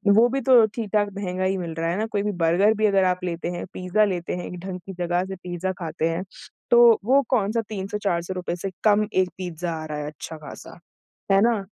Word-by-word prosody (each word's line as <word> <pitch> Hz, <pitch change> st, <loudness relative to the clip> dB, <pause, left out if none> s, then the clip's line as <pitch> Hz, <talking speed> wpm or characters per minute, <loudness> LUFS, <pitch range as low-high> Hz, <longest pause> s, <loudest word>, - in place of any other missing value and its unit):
वो 230 Hz, +2 st, +6 dB
भी 270 Hz, +2 st, -1 dB
तो 245 Hz, -4 st, +7 dB
ठीक-ठाक 210 Hz, -2 st, 0 dB
महँगा 185 Hz, -2 st, -3 dB
ही 190 Hz, +1 st, +1 dB
मिल 170 Hz, -3 st, -4 dB
रहा 165 Hz, +1 st, -1 dB
है 175 Hz, -, -1 dB
ना, 215 Hz, -, 0 dB
कोई 205 Hz, -2 st, -2 dB
भी 210 Hz, -, 0 dB
बर्गर 190 Hz, +6 st, +4 dB
भी 215 Hz, -, +2 dB
अगर 195 Hz, -2 st, +4 dB
आप 180 Hz, 0 st, 0 dB
लेते 170 Hz, -1 st, -3 dB
हैं, 175 Hz, -, -5 dB
पिज्जा 185 Hz, +3 st, +1 dB
लेते 180 Hz, -4 st, -2 dB
हैं 180 Hz, -, -5 dB
एक 180 Hz, -, -7 dB
ढंग 185 Hz, -1 st, -5 dB
की 195 Hz, -, -7 dB
जगह 175 Hz, 0 st, 0 dB
से 190 Hz, 0 st, -6 dB
पिज्जा 180 Hz, 0 st, -4 dB
खाते 165 Hz, -1 st, -2 dB
हैं, 165 Hz, +2 st, -2 dB, 0.5 s
तो 240 Hz, -1 st, +7 dB
वो 270 Hz, +4 st, +5 dB
कौन-सा 225 Hz, -1 st, +1 dB
₹300-400 190 Hz, -3 st, -3 dB
से 190 Hz, +2 st, -5 dB
कम 210 Hz, 0 st, +4 dB
1 185 Hz, -1 st, +2 dB
पिज्जा 175 Hz, -2 st, -4 dB
आ -, -, -6 dB
रहा 155 Hz, -1 st, -5 dB
है 150 Hz, 0 st, -4 dB
अच्छा 155 Hz, +2 st, -8 dB
ख़ासा, 150 Hz, -, -11 dB, 0.5 s
है 195 Hz, 0 st, +5 dB
ना? 225 Hz, -2 st, +2 dB
185 Hz, 225 wpm, -24 LUFS, 175-210 Hz, 0.5 s, तो